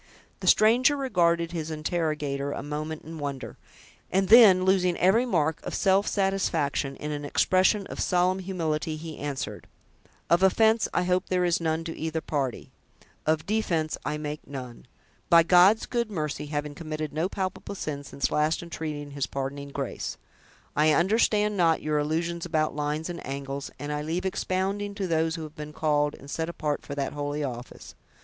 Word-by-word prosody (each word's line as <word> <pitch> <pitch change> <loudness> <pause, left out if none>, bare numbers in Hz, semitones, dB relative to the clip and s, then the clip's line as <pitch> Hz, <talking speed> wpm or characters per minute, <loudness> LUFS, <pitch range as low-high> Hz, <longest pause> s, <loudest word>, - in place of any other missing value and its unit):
The - - -5
stranger 245 +7 +5
regarded 170 -10 +1
his 160 -2 -4
interrogator 155 -3 -2
a - - -5
moment 150 +2 -4
in 160 0 -8
wonder; 140 -2 -5 0.5
and 190 0 +1
then, 205 -5 +8
losing 185 -2 +3
every 220 +8 +3
mark 160 -7 0
of - - -4
self 195 +1 +3
satisfaction 165 -8 0
in 150 - -5
an 145 -1 -4
expression 185 +7 +2
of - - -8
solemn 180 +1 +2
humility, 160 -4 -2
he 160 0 -8
answered: 145 -2 -5 0.6
"Of 170 +2 +3
offense, 220 +4 +4
I 180 - +1
hope 180 0 0
there 180 -1 +2
is 175 -1 +1
none, 160 0 0
to 165 0 -5
either 160 0 -2
party: 140 -6 -3 0.6
of 155 0 +1
defense, 175 -7 0
I 150 - -2
make 150 0 -6
none—by 135 +5 -1
God's 180 +5 +5
good 235 -2 -1
mercy, 150 -5 -3
having 145 0 -3
committed 155 -1 -5
no 160 +4 0
palpable 190 +1 -4
sin 145 -6 -4
since 140 - -2
last 155 +3 +1
entreating 150 -4 -5
his 140 -1 -2
pardoning 140 +1 -4
grace. 140 -2 -4 0.6
I 155 +1 +4
understand 210 +3 +2
not 165 -3 +3
your 150 -1 +1
allusions 165 +3 -1
about 155 -4 0
lines 150 +2 -2
and 175 -1 -6
angles; 135 +1 -5
and 145 +1 -4
I 150 - -2
leave 165 +5 -2
expounding 195 +2 -1
to 200 -2 -2
those 160 -1 +1
who 165 - -5
have 155 0 -9
been 150 -1 -7
called 150 -1 +1
and 140 - -14
set 160 +3 -3
apart 150 -3 -2
for 140 - -6
that 140 -1 -2
holy 145 0 -3
office. 125 -2 -7
160 Hz, 170 wpm, -27 LUFS, 150-185 Hz, 0.6 s, then